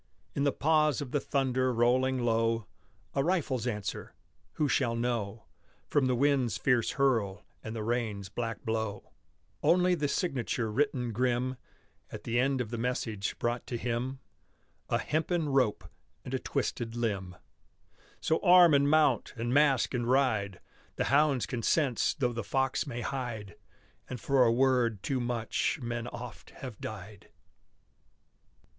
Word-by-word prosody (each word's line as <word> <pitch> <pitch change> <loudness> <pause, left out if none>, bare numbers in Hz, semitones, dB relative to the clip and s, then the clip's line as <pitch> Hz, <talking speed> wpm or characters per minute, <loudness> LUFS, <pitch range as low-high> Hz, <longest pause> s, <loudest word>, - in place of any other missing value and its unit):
In 140 - 0
the 140 - +3
pause 155 -1 +2
of 140 -4 -5
the 145 - +1
thunder 130 -2 0
rolling 125 +2 +2
low, 115 -2 +1 0.5
A 135 - +1
rifle's 140 -8 0
answer 105 -4 -4 0.4
who 150 - 0
shall 120 -4 +1
know 115 -3 -2 0.4
From 140 -3 +2
the 130 - +2
wind's 135 -2 +2
fierce 125 -4 +1
hurl 115 -8 +1 0.2
and 110 +1 -6
the 110 - -3
rain's 110 -4 -2
black 115 +3 -5
blow? 110 -2 -3 0.5
Only 180 +1 +4
the 150 -4 0
signature 130 - -1
written 125 -1 0
grim 125 +2 0 0.6
At - - -8
the 120 +1 0
end 135 0 +2
of 115 -2 -5
the 120 - -3
message 115 -4 -2
brought 120 +1 -2
to 120 - -3
him, 120 +3 -2 0.7
A - - +2
hempen 160 0 -1
rope 130 -6 +1 0.4
and - - -6
a - - 0
twisted 115 -1 -3
limb. 100 -6 -2 0.8
So 160 - +1
arm 180 -3 +7
and 140 0 +4
mount! 150 -6 +3
and 120 +1 -2
mask 140 -3 +3
and 120 -1 -1
ride! 110 -8 +1 0.4
The - - 0
hounds 140 -3 +3
can 120 - -4
sense 135 0 +1
though 125 -3 0
the 115 -1 -3
fox 135 +4 0
may 120 0 -4
hide! 115 -8 -4 0.5
And 125 - -5
for 135 +2 +3
a 115 - +4
word 120 -4 +2
too 135 -2 -1
much 120 +4 -1
men 120 -1 -4
oft 120 -8 -8
have 125 -5 -9
died. 105 -1 -8
125 Hz, 150 wpm, -30 LUFS, 115-135 Hz, 0.8 s, arm